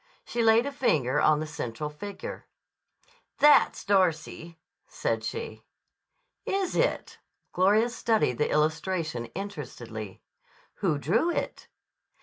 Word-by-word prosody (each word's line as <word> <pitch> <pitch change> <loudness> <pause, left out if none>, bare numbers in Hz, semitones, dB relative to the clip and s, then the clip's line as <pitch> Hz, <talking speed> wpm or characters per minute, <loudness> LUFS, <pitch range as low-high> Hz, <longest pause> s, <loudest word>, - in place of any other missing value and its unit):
She 235 - -2
laid 225 +2 +5
a 280 - -3
finger 155 - +1
on 155 -1 +4
the 155 - -3
central 150 -2 -5
figure. 200 +6 -8 0.9
"That's 295 -1 +5
Darcy," 170 -3 0 0.3
said - - -2
she. 460 0 -5 0.8
"Is 390 -2 -1
it?" - - 0 0.3
Gloria 205 +5 +4
studied 220 - +1
the 150 - +1
illustration 155 -3 0
interestedly. 125 - -7 0.5
"Who 165 -7 0
drew 220 - +1
it?" - - -3
180 Hz, 110 wpm, -27 LUFS, 150-225 Hz, 0.9 s, laid